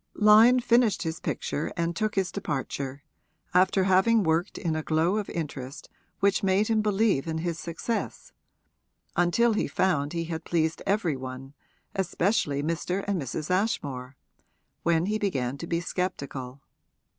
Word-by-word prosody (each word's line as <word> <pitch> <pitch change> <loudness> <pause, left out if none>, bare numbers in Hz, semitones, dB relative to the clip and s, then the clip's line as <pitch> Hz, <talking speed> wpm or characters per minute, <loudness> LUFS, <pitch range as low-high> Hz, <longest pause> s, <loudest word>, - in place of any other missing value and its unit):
Lyon 220 +4 +7
finished 235 -4 +3
his 160 0 -3
picture 150 - -3
and 170 0 -1
took 215 +3 -1
his 190 -3 0
departure, 140 -1 -4 0.5
after 185 +1 +4
having 195 +4 +4
worked 165 +3 0
in 165 -3 -1
a 155 - -1
glow 160 +6 +1
of 210 - -3
interest 140 -4 -6 0.3
which 200 0 +3
made 195 +2 +2
him 220 -1 +3
believe 210 -7 +1
in 160 0 -2
his 170 0 -3
success, 175 +7 -4 0.8
until 220 +7 +3
he 210 - 0
found 150 -6 0
he 170 -1 -1
had 160 -1 -5
pleased 160 -1 0
every 195 -7 +1
one, 130 +1 -8 0.4
especially 180 -6 0
Mr. 175 +4 -2
and 195 -5 0
Mrs. 150 +5 -4
Ashmore, 140 - -1 0.6
when 165 0 +2
he 215 +2 -1
began 135 -11 -1
to 170 - -6
be 170 0 0
sceptical. 140 -7 -4
170 Hz, 145 wpm, -27 LUFS, 150-200 Hz, 0.8 s, Lyon